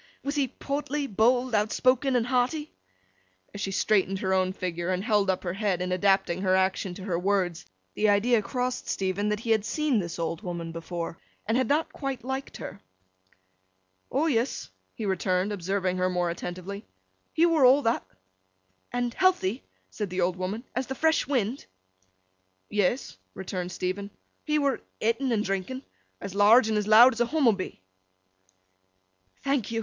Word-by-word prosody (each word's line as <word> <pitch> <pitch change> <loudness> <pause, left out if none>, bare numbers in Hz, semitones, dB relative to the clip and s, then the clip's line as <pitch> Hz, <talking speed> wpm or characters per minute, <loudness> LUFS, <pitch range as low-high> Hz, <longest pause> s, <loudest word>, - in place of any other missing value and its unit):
Was 280 - -2
he 285 -3 +1
portly, 285 +2 -3
bold, 245 +2 +2
outspoken, 255 +5 +2
and 235 -2 +2
hearty?' 260 +5 0 0.8
As 205 - -6
she 195 - -1
straightened 195 0 +1
her 190 0 -1
own 185 0 +2
figure, 175 -2 -3
and 185 0 0
held 210 -3 +2
up 185 - 0
her 175 -2 -2
head 195 -2 0
in 180 0 -2
adapting 185 -1 +2
her 185 -1 +3
action 190 -1 0
to 190 - -9
her 180 -4 -1
words, 180 - 0 0.3
the 215 - +2
idea 215 +3 +3
crossed 250 +3 -3
Stephen 195 +2 -1
that 210 0 -1
he 230 - -2
had 220 -2 +3
seen 295 0 +1
this 170 -3 -4
old 165 +1 -3
woman 170 -4 -5
before, 165 0 -5 0.3
and 225 - 0
had 255 -1 +2
not 300 +5 +1
quite 275 -3 -4
liked 265 +2 -4
her. - - -8 1.3
'O 285 +4 +1
yes,' 240 - -1 0.2
he 220 - -4
returned, 190 0 0
observing 190 -1 -1
her 185 0 +1
more 180 -1 0
attentively, 185 +4 -6 0.5
'he 330 - +3
were 330 -4 +3
all 265 +3 +6
that.' 230 +1 +1 0.9
'And 245 -1 -1
healthy,' 320 - +2 0.3
said 210 -3 -4
the 185 +1 -2
old 175 0 +1
woman, 190 +5 -4
'as 255 +1 -1
the 265 - -4
fresh 320 -1 +2
wind?' 255 -2 -1 1.0
'Yes,' 210 +5 0 0.2
returned 180 -1 -4
Stephen. 185 +2 -3 0.4
'He 300 0 +1
were 280 -2 +1 0.2
ett'n 230 +4 0
and 215 -2 +1
drinking—as 195 0 -6
large 215 +4 +6
and 215 - +1
as 210 - -3
loud 235 +4 +8
as 235 - -3
a 240 - +3
Hummobee.' 235 - +1 1.6
'Thank 275 -5 0
you! 225 0 -1
210 Hz, 165 wpm, -27 LUFS, 185-255 Hz, 1.6 s, loud